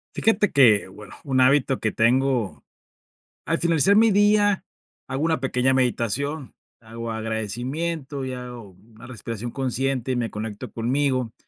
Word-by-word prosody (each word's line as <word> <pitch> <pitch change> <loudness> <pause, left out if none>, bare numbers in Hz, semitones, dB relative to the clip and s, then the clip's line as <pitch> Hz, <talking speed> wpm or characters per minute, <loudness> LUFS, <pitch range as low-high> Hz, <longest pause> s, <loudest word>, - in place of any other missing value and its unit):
Fíjate 215 -2 +2
que, 115 -8 +5
bueno, 105 0 -12
un 130 -3 +1
hábito 135 0 +3
que 110 - -1
tengo, 120 -1 +1 0.8
al - - 0
finalizar 170 +4 +3
mi 225 0 +5
día, 205 0 +3 0.4
hago 130 +1 -4
una 160 -5 0
pequeña 130 0 +1
meditación, 130 +3 -1 0.3
hago 115 0 -7
agradecimiento, 130 +7 -3
y 130 - -4
hago 125 -4 -8
una 110 +5 -17
respiración 120 -1 -6
consciente, 130 0 -2
y - - -2
me 120 -2 -1
conecto 105 +2 -6
conmigo. 130 0 -1
130 Hz, 135 wpm, -23 LUFS, 115-140 Hz, 0.8 s, que